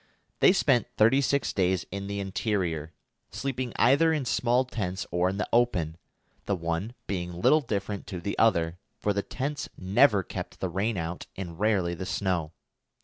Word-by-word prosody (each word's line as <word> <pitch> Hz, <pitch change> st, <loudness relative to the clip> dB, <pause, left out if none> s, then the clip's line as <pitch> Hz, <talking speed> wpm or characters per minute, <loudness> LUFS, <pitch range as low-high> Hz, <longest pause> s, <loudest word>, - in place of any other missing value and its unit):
They -, -, +7 dB
spent 135 Hz, -, +3 dB
thirty 115 Hz, +6 st, +5 dB
six 140 Hz, +1 st, +1 dB
days 95 Hz, -2 st, +1 dB
in 100 Hz, +1 st, -4 dB
the 100 Hz, 0 st, -3 dB
interior, 95 Hz, -6 st, -2 dB, 0.4 s
sleeping 130 Hz, -3 st, -3 dB
either 140 Hz, +7 st, +4 dB
in 150 Hz, -4 st, 0 dB
small 125 Hz, +1 st, +2 dB
tents 95 Hz, -6 st, -3 dB
or 90 Hz, +1 st, +2 dB
in 95 Hz, -, -3 dB
the 105 Hz, -, -1 dB
open, 90 Hz, -10 st, +2 dB, 0.5 s
the 100 Hz, -, +1 dB
one 85 Hz, +7 st, -3 dB
being 90 Hz, -2 st, -3 dB
little 155 Hz, -, +5 dB
different 100 Hz, -5 st, -3 dB
to 95 Hz, -2 st, -5 dB
the 100 Hz, +4 st, -3 dB
other, 85 Hz, -6 st, +2 dB, 0.2 s
for 105 Hz, -2 st, 0 dB
the 100 Hz, -, 0 dB
tents 145 Hz, +7 st, -4 dB
never 100 Hz, +2 st, +4 dB
kept -, -, -7 dB
the 95 Hz, -, -2 dB
rain 100 Hz, +5 st, -1 dB
out 85 Hz, +1 st, -4 dB
and 85 Hz, -3 st, -7 dB
rarely 100 Hz, -5 st, +2 dB
the 90 Hz, +2 st, -5 dB
snow. 90 Hz, -6 st, -1 dB
100 Hz, 170 wpm, -28 LUFS, 90-120 Hz, 0.5 s, They